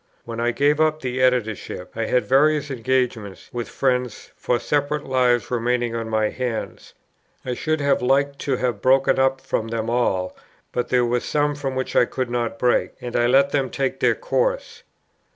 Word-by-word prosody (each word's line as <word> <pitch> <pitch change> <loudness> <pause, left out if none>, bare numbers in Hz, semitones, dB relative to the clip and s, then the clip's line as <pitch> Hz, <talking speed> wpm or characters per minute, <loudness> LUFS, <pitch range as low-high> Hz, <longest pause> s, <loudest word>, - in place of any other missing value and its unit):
When 115 -1 -6
I 120 +1 +1
gave 145 +5 +2
up 155 0 +2
the 130 0 -2
Editorship, 110 -7 -1
I 115 0 -1
had 125 - +1
various 145 +2 +3
engagements 125 -5 -2
with 120 -1 -4
friends 125 -3 -1
for 125 - 0
separate 145 +2 -1
Lives 125 -2 +1
remaining 120 0 0
on 115 -1 -3
my 110 -1 +1
hands. 125 -3 -5 0.5
I 125 - -2
should 155 +5 -1
have 140 -1 +2
liked 140 +2 +1
to 135 - -1
have 120 -5 -2
broken 135 +1 +4 0.2
from 130 -4 -3
them 115 0 -3
all, 95 -7 0 0.4
but 125 - -2
there 125 -1 +3
were 120 +1 +1
some 145 +3 0
from 140 -2 -4
which 130 0 -3
I - - +5
could 130 0 -4
not 120 -2 -2
break, 120 +1 +1
and 120 -1 -6
I 120 0 +3
let 135 +3 +4
them 135 -3 0
take 135 0 -2
their - - +3
course. - - -2
125 Hz, 180 wpm, -22 LUFS, 120-140 Hz, 0.5 s, I